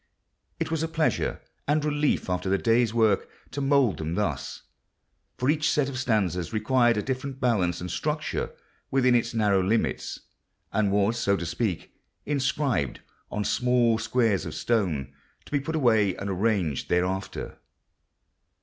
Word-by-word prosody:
It - - -2
was 160 -1 0
a 165 - 0
pleasure 160 -1 0 0.3
and 150 +1 +2
relief 150 0 +1
after 90 +1 -1
the 100 - +3
day's 115 +1 +2
work 110 -4 +2 0.2
to 140 - -3
mould 135 -6 +3
them 80 +2 -3
thus, 90 -10 -2 0.7
for 125 - -1
each 155 +2 +2
set 145 -2 +1
of 130 -1 -4
stanzas 95 - 0
required 120 +1 +3
a 105 - 0
different 130 0 -4
balance 95 - +1
and 90 -1 -5
structure 150 - -2 0.4
within 130 -2 +3
its 120 -1 +1
narrow 105 -3 +3
limits, 105 +5 -1 0.5
and 100 -1 +2
was, 105 +4 +2
so 100 -3 +2
to 85 - -4
speak, 95 +1 -2 0.3
inscribed 135 - 0 0.3
on 105 - -2
small 120 -1 +2
squares 115 -3 +1
of - - -6
stone, 80 - 0 0.3
to - - -15
be 145 - +2
put 160 +4 -4
away 110 - +3
and 100 0 -4
arranged 95 - 0
thereafter. 90 +2 -2
115 Hz, 150 wpm, -26 LUFS, 95-135 Hz, 0.7 s, the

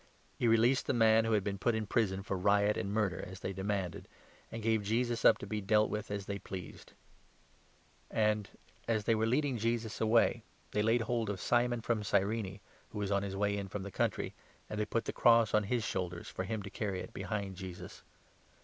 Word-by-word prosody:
He 120 - +2
released 115 +3 +4
the - - +1
man 110 -1 +5
who 115 - +1
had 105 -3 +2
been 100 -1 -3
put 120 +1 +1
in 110 -1 -1
prison 95 -2 0
for 95 - -2
riot 100 +2 +3
and 100 - -3
murder, 105 -4 0
as 95 +1 -10
they 95 - -3
demanded, 95 -2 -3 0.4
and 115 -1 -6
gave 110 -1 +2
Jesus 115 +3 0
up - - +7
to - - -7
be 105 -1 -3
dealt 105 +2 +3
with 105 0 -3
as 100 -1 -3
they 100 0 -4
pleased. 95 -4 -9 1.2
The - - -13
And, 105 -2 +2 0.4
as 110 -2 +1
they 115 - +3
were 110 0 +1
leading 130 0 +1
Jesus 115 0 -1
away, 115 +1 +3 0.3
they 105 - -1
Crucifixion - - 0
laid 115 +1 +3
hold 115 -1 -1
of 100 -2 -3
Simon 120 +1 +1
from 115 -2 -1
Cyrene, 100 0 0 0.3
who - - -8
was 100 -1 -2
on 100 0 +2
his 100 -1 -4
of - - -5
Jeaus. - - -4
way 100 0 +1
jn 100 -1 -4
from 100 +1 -4
the 100 - -7
country, - - -1 0.4
and 105 - -3
they 105 - +1
put 115 +1 -1
the - - -3
cross 115 -2 +5
on 105 -1 +3
his 120 +2 0
shoulders, 90 -4 -3
for 95 - -4
him 110 0 -3
to 100 - -8
carry 100 -4 -3
it 115 - -9
behind 100 -3 -3
Jesus. 90 -1 -8
105 Hz, 225 wpm, -33 LUFS, 100-115 Hz, 1.2 s, up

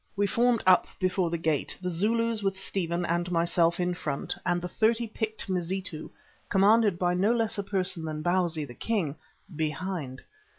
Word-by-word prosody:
We 205 0 +2
formed 235 +2 +2
up 185 -1 +5
before 185 -1 +1
the 170 - -1
gate, 160 -3 -1
the 180 -1 -3
Zulus 225 +5 +1
with 195 -1 -1
Stephen 175 -2 -2
and 175 +1 -1
myself 170 0 +2
in 180 0 0
front 150 -5 -3
and 175 -1 +2
the 175 - -4
thirty 225 +5 +1
picked 220 0 -4
Mazitu, 180 -3 -2 0.4
commanded 205 0 +4
by 180 0 +1
no 195 +5 +2
less 225 -2 0
a - - -1
person 185 -4 0
than 155 -1 -4
Bausi, 175 -3 +1
the 125 - -11
king, 180 - -1 0.4
behind. 155 -3 -3
180 Hz, 170 wpm, -28 LUFS, 170-205 Hz, 0.4 s, up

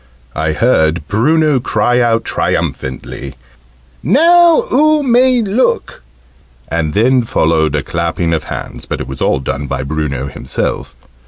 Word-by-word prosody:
I 80 -1 -1
heard 80 - +1
Bruno 150 +6 +2
cry 125 0 +1
out 115 -1 +1
triumphantly 65 +1 -3 0.7
"Now 340 - +4
oo 305 0 +3
may 250 -1 +3
look!" 215 +5 -1 0.7
and 80 -2 -2
then 125 +4 +3
followed 80 - 0
a 75 - -1
clapping 85 +2 -2
of 80 -2 -2
hands, - - -7
but - - -4
it - - -5
was 65 - -8
all 65 - +1
done 70 +2 -4
by - - -3
Bruno 70 -2 -3
himself. 65 - -4
85 Hz, 135 wpm, -14 LUFS, -, 0.7 s, Now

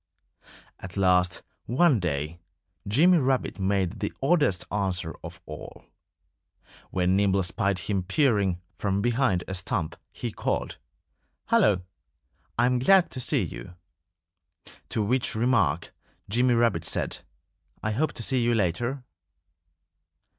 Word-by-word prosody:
At 90 +1 -8
last, 90 -2 +2 0.2
one 135 +1 +4
day, 80 -1 -3 0.5
Jimmy 165 - +5
Rabbit 130 -5 0
made 95 -2 0
the - - -2
oddest 140 - +2
answer 95 -5 -1
of 85 +1 -9
all. 75 0 -10 1.0
When 90 0 +1
Nimble 100 -1 +2
spied 100 +1 0
him 95 +2 -1
peering 100 - +1 0.2
from 100 0 0
behind 120 -7 +1
a 95 - -4
stump 90 -3 -2 0.2
he - - -5
called, - - -3 0.7
"Hullo! 95 -4 +4 0.7
I'm 125 +1 +3
glad 190 +7 +5
to 130 - -6
see 125 - +1
you." - - -8 1.1
To 110 - 0
which 125 +3 0
remark 110 - +1 0.3
Jimmy 120 +4 +2
Rabbit 115 -9 +2
said, - - -1 0.6
"I 110 - 0
hope 150 +9 0
to 115 - -6
see 130 +2 +1
you 120 0 +2
later." 120 +7 -1
100 Hz, 120 wpm, -26 LUFS, 90-125 Hz, 1.1 s, Jimmy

